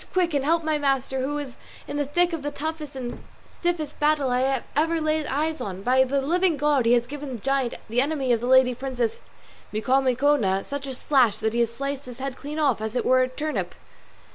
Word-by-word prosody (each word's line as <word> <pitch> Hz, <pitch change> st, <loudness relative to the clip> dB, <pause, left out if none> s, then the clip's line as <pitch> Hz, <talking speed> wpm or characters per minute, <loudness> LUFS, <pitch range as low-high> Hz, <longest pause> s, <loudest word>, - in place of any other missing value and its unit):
quick; 355 Hz, -3 st, +2 dB
and 280 Hz, -2 st, +1 dB
help 325 Hz, +3 st, +2 dB
my 310 Hz, -1 st, 0 dB
master, 270 Hz, -2 st, 0 dB
who 290 Hz, +3 st, -2 dB
is 280 Hz, -4 st, -6 dB, 0.3 s
in -, -, -5 dB
the 290 Hz, -1 st, -1 dB
thick 350 Hz, +4 st, +2 dB
of 325 Hz, -, -3 dB
the 290 Hz, -, -2 dB
toughest 300 Hz, 0 st, -5 dB
and 250 Hz, -2 st, -6 dB, 0.2 s
stiffest 330 Hz, -4 st, -3 dB
battle 295 Hz, -3 st, +2 dB
I 260 Hz, +1 st, +1 dB
ever 325 Hz, +3 st, +2 dB
laid 310 Hz, -1 st, 0 dB
eyes 310 Hz, +3 st, -1 dB
on. 190 Hz, -1 st, -5 dB
By 255 Hz, +3 st, +4 dB
the 275 Hz, +1 st, 0 dB
living 350 Hz, +2 st, +2 dB
God 285 Hz, -4 st, +2 dB
he 235 Hz, -, +5 dB
has 240 Hz, -1 st, +3 dB
given 285 Hz, +1 st, -6 dB
the -, -, -7 dB
giant, 270 Hz, -3 st, 0 dB
the 235 Hz, +3 st, +1 dB
enemy 275 Hz, -2 st, 0 dB
of 230 Hz, -, 0 dB
my 245 Hz, -, -2 dB
lady 260 Hz, -1 st, +5 dB
the 240 Hz, -, -15 dB
Princess 250 Hz, -4 st, -2 dB, 0.5 s
Micomicona, 255 Hz, -3 st, +2 dB
such 280 Hz, 0 st, -5 dB
a 265 Hz, -, -4 dB
slash 250 Hz, -6 st, +3 dB
that 220 Hz, 0 st, -1 dB
he 235 Hz, -, 0 dB
has 235 Hz, -1 st, +2 dB
sliced 275 Hz, +3 st, -4 dB
his 250 Hz, -2 st, -9 dB
head 270 Hz, 0 st, -4 dB
clean 295 Hz, +3 st, -7 dB
off 275 Hz, -8 st, +2 dB
as 220 Hz, +2 st, -4 dB
if -, -, 0 dB
it -, -, 0 dB
were 255 Hz, 0 st, +5 dB
a 255 Hz, -, +2 dB
turnip." 300 Hz, +4 st, -3 dB
275 Hz, 230 wpm, -25 LUFS, 250-300 Hz, 0.5 s, he